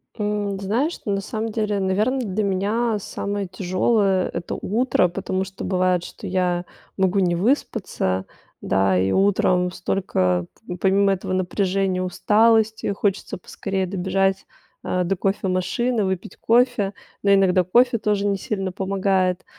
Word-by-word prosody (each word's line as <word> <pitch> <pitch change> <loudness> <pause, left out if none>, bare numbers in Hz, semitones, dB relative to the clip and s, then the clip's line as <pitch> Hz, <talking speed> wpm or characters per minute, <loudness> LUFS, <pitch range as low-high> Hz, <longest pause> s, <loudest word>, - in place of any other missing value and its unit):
М, 205 -2 -2
знаешь, 235 - -1
на 200 -1 0
самом 220 +3 -4
деле, 210 -2 -1
наверно, 210 +8 +1
для 215 -3 -2
меня 210 +4 0
самое 200 0 -4
тяжёлое, 185 +1 +1
это - - -4
утро, 230 -1 +1
потому 190 +1 -2
что 190 0 -8
бывает, 185 -2 +1
что - - -10
я 180 -1 0 0.3
могу 190 0 +2
не 175 -2 +2
выспаться. 185 - -1 0.4
Да, 95 -1 +2
и 95 +1 +1
утром 185 -2 +2
столько 90 - 0 0.3
помимо 195 +1 +3
этого 190 0 -5
напряжения, 185 0 0
усталости, 220 +4 +2
хочется 200 0 -2
поскорее 190 +1 -3
добежать, 190 +1 0 0.4
а, 180 0 0
до 185 +2 0
кофемашины, 195 +5 0
выпить 190 -1 -4
кофе. 235 -4 +2 0.3
Но 200 - +2
иногда 190 -2 +4
кофе 235 +6 +3
тоже 205 -1 0
не 200 -1 +1
сильно 195 -1 -3
помогает. 190 -1 0
195 Hz, 130 wpm, -22 LUFS, 185-210 Hz, 0.4 s, иногда